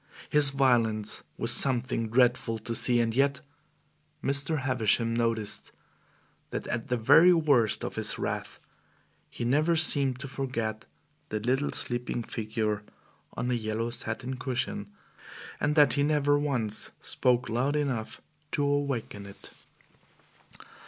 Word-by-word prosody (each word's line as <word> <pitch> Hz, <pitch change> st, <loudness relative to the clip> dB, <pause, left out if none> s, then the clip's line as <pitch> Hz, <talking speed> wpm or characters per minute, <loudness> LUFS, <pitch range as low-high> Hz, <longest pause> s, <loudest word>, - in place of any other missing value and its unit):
His 150 Hz, -2 st, +5 dB
violence 120 Hz, -6 st, +1 dB, 0.2 s
was -, -, +3 dB
something 125 Hz, -3 st, +3 dB
dreadful 120 Hz, -1 st, +2 dB
to 115 Hz, +1 st, -5 dB
see, 120 Hz, +1 st, +5 dB
and 115 Hz, -1 st, 0 dB
yet 140 Hz, +1 st, +1 dB, 0.8 s
Mr. 140 Hz, +2 st, +1 dB
Havisham 115 Hz, -3 st, +1 dB
noticed 115 Hz, -3 st, -1 dB, 0.8 s
that -, -, -5 dB
at 115 Hz, -1 st, -4 dB
the 125 Hz, -, 0 dB
very 160 Hz, +10 st, +6 dB
worst 140 Hz, -10 st, +2 dB
of -, -, -6 dB
his -, -, -1 dB
wrath -, -, -4 dB, 0.7 s
he 120 Hz, -, -5 dB
never 150 Hz, +7 st, +2 dB
seemed 140 Hz, -5 st, +2 dB
to 140 Hz, -, -5 dB
forget 115 Hz, -5 st, -4 dB, 0.4 s
the 110 Hz, -, -2 dB
little 130 Hz, +6 st, 0 dB
sleeping 120 Hz, -1 st, -4 dB
figure 110 Hz, -2 st, -3 dB, 0.5 s
on 125 Hz, -, -3 dB
the 125 Hz, -, 0 dB
yellow 115 Hz, +1 st, -3 dB
satin 120 Hz, +2 st, -5 dB
cushion, 125 Hz, -5 st, -3 dB, 0.7 s
and 150 Hz, +1 st, 0 dB
that 145 Hz, -3 st, +5 dB
he 145 Hz, -, +1 dB
never 145 Hz, -1 st, +2 dB
once 125 Hz, -8 st, -1 dB
spoke 125 Hz, 0 st, 0 dB
loud 130 Hz, +6 st, -1 dB
enough 135 Hz, -7 st, -3 dB, 0.3 s
to 145 Hz, -, 0 dB
awaken 140 Hz, -8 st, -2 dB
it. 100 Hz, -, -12 dB
125 Hz, 130 wpm, -28 LUFS, 115-140 Hz, 0.8 s, very